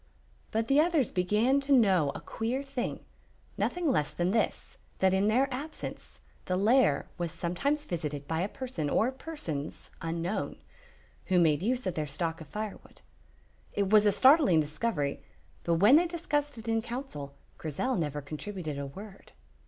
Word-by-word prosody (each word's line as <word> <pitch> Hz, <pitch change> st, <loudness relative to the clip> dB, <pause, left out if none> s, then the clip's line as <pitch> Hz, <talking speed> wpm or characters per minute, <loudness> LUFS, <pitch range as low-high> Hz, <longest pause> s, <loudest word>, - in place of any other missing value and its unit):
But 225 Hz, +1 st, -1 dB
the 275 Hz, +3 st, +4 dB
others 315 Hz, -6 st, +2 dB
began 210 Hz, +9 st, +2 dB
to 275 Hz, +1 st, -4 dB
know 190 Hz, -, +5 dB
a -, -, -6 dB
queer 245 Hz, +5 st, -3 dB
thing, 275 Hz, -3 st, -4 dB, 0.5 s
nothing 355 Hz, -2 st, -1 dB
less 150 Hz, -, +2 dB
than 175 Hz, +1 st, -1 dB
this, 225 Hz, +1 st, -1 dB, 0.2 s
that 190 Hz, 0 st, +3 dB
in 195 Hz, +2 st, +2 dB
their 250 Hz, +5 st, +3 dB
absence 295 Hz, +5 st, -6 dB, 0.2 s
the 185 Hz, -, 0 dB
lair 210 Hz, -, +3 dB
was 170 Hz, -2 st, -1 dB
sometimes 280 Hz, -, -1 dB
visited 150 Hz, -, -4 dB
by 160 Hz, 0 st, -1 dB
a 195 Hz, -, -1 dB
person 245 Hz, -, -4 dB
or 235 Hz, -, +2 dB
persons 260 Hz, -, -6 dB
unknown, 165 Hz, +4 st, -2 dB, 0.7 s
who 185 Hz, -2 st, +3 dB
made 155 Hz, -3 st, +3 dB
use 245 Hz, +4 st, 0 dB
of 185 Hz, -, -1 dB
their 155 Hz, -2 st, -2 dB
stock 165 Hz, +3 st, -3 dB
of 160 Hz, -, -9 dB
firewood. 210 Hz, +6 st, -7 dB, 0.7 s
It 200 Hz, -1 st, 0 dB
was 215 Hz, -1 st, +6 dB
a -, -, +6 dB
startling 265 Hz, -, +6 dB
discovery, 150 Hz, -1 st, -1 dB, 0.4 s
but 170 Hz, -, +2 dB
when 210 Hz, -, +7 dB
they 350 Hz, +2 st, +3 dB
discussed 295 Hz, -5 st, -2 dB
it 225 Hz, 0 st, -9 dB
in 225 Hz, 0 st, +1 dB
council, 235 Hz, -, -6 dB, 0.2 s
Grizel 165 Hz, -, -1 dB
never 150 Hz, -4 st, -2 dB
contributed 155 Hz, 0 st, -5 dB
a 140 Hz, -, -4 dB
word. 195 Hz, +7 st, -11 dB
205 Hz, 160 wpm, -30 LUFS, 165-260 Hz, 0.7 s, when